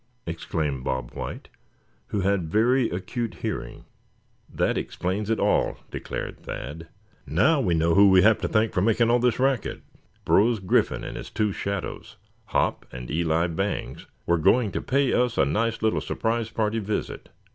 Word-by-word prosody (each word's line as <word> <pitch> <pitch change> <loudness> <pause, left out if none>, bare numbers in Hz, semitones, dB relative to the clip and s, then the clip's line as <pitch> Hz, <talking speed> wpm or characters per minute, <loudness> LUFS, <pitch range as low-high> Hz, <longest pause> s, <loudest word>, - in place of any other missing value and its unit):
exclaimed 80 -5 -3
Bob 65 -2 -3
White, - - -6 0.6
who 100 - -2
had 95 -4 0
very 120 +4 +3
acute 115 +6 -4
hearing. - - -4 0.7
"That - - 0
explains 100 +4 -3
it 115 - +1
all," - - +1
declared - - -5
Thad. 80 +5 -7 0.4
"Now 155 -3 +3
we 90 -8 +1
know 80 +1 +2
who 100 +2 +7
we 95 -1 +6
have 110 +1 +5
to 90 - 0
thank 110 +4 +1
for 90 - +1
making 115 +3 +3
all 120 - +4
this 120 -1 +2
racket. 135 -1 0 0.4
Brose 115 +3 +4
Griffin 95 -2 +1
and - - -6
his - - -7
two 105 -1 0
shadows, 100 0 -5 0.3
Hop, - - -1
and 60 +1 -7
Eli 80 +1 +1
Bangs 95 +4 -3 0.2
were 85 -1 +2
going 110 +6 +3
to - - -3
pay 140 0 +1
us 125 -2 +1
a - - +4
nice 115 +10 -1
little 110 - +2
surprise 115 0 -1
party 110 0 -1
visit. 105 0 -4
105 Hz, 165 wpm, -25 LUFS, 85-115 Hz, 0.7 s, who